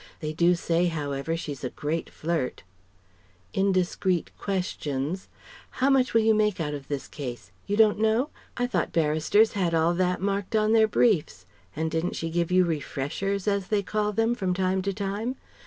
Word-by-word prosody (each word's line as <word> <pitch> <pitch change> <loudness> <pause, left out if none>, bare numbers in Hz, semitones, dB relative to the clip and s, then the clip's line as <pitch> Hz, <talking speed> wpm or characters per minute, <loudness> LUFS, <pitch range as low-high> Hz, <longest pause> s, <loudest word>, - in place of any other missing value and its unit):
They 155 -1 -3
do 170 +2 +4
say 170 +1 +1
however 150 -1 -2
she's 145 -5 -6
a 125 - -1
great 155 +5 -3
flirt..." 160 -5 -3 0.9
Indiscreet 185 -2 +1
questions: 180 -4 -3 0.5
"How 270 +2 +3
much 260 -3 +2
will 225 - +5
you 220 0 +5
make 210 -3 +1
out 150 -2 -2
of 140 -2 -7
this 140 -2 -4
case? 125 -5 -7 0.2
You 205 +1 0
don't 215 -2 +5
know? 220 +6 +2 0.3
I 245 - +1
thought 185 -9 -1
barristers 160 +7 +3
had 175 -4 0
all 165 +1 +3
that 180 0 +1
marked 200 +1 -1
on 215 0 +3
their 220 -1 +5
briefs? 200 - +1 0.3
And 160 +1 -1
didn't 165 +2 -1
she 165 0 -3
give 170 0 0
you 185 0 +5
'refreshers,' 170 +5 -2
as 200 -2 +1
they 210 -2 +1
call 210 +2 -1
them, 225 +3 +1
from 190 -6 -1
time 190 0 +1
to 200 +1 -1
time? 205 +5 -3
185 Hz, 175 wpm, -26 LUFS, 160-210 Hz, 0.9 s, will